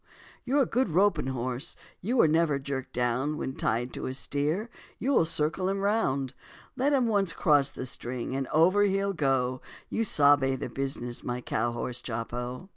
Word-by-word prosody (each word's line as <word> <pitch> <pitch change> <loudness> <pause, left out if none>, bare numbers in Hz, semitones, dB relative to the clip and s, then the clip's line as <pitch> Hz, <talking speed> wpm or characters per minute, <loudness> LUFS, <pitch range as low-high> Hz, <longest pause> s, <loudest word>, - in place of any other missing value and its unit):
You're 275 +3 +3
a - - 0
good 245 -1 0
roping 170 -4 +2
horse, 130 +2 -4 0.3
you 235 +8 -1
were 195 - +6
never 160 -2 +2
jerked 135 -1 -5
down, 125 +5 0
When 130 - -4
tied 120 +3 -1
to - - -4
a 130 - -4
steer, 150 - -1 0.3
you 270 - -1
will 170 - +4
circle 160 +4 0
him 195 - 0
round; 140 - 0 0.4
Let 270 +3 +1
him 270 -4 +3
once 200 -5 +1
cross 145 -3 +3
the 130 - -6
string 125 0 -4
and 135 -1 -2
over 185 +6 +4
he'll 195 0 +1
go, 130 -5 0 0.3
You 225 - 0
sabe 145 -7 +4
the 125 - -5
business, 125 -2 -4
my 120 0 -3
cow 120 -1 -1
horse, 120 +1 -4
Chopo. 120 - -5
140 Hz, 180 wpm, -28 LUFS, 130-195 Hz, 0.4 s, were